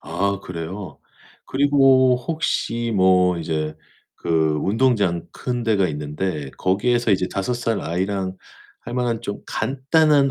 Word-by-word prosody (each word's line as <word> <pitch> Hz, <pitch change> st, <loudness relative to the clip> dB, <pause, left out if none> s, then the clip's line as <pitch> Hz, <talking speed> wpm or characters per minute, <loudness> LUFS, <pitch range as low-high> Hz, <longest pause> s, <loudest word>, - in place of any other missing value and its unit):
아, 100 Hz, 0 st, -1 dB
그래요? 90 Hz, +2 st, -7 dB, 0.5 s
그리고 135 Hz, -2 st, +4 dB
혹시 120 Hz, -5 st, -2 dB
뭐 90 Hz, -2 st, +4 dB
이제 75 Hz, -1 st, -2 dB, 0.4 s
그 -, -, -9 dB, 0.3 s
운동장 105 Hz, -6 st, +1 dB
큰 125 Hz, -1 st, -3 dB
데가 105 Hz, -5 st, +2 dB
있는데 75 Hz, 0 st, -4 dB
거기에서 120 Hz, +5 st, +1 dB
이제 95 Hz, -1 st, +2 dB
5 100 Hz, +6 st, -2 dB
살 115 Hz, -2 st, -1 dB
아이랑 95 Hz, +2 st, -2 dB, 0.4 s
할만한 120 Hz, -1 st, -2 dB
좀 100 Hz, -, -4 dB
간단한 140 Hz, +1 st, +2 dB
105 Hz, 225 characters per minute, -22 LUFS, 90-125 Hz, 0.5 s, 그리고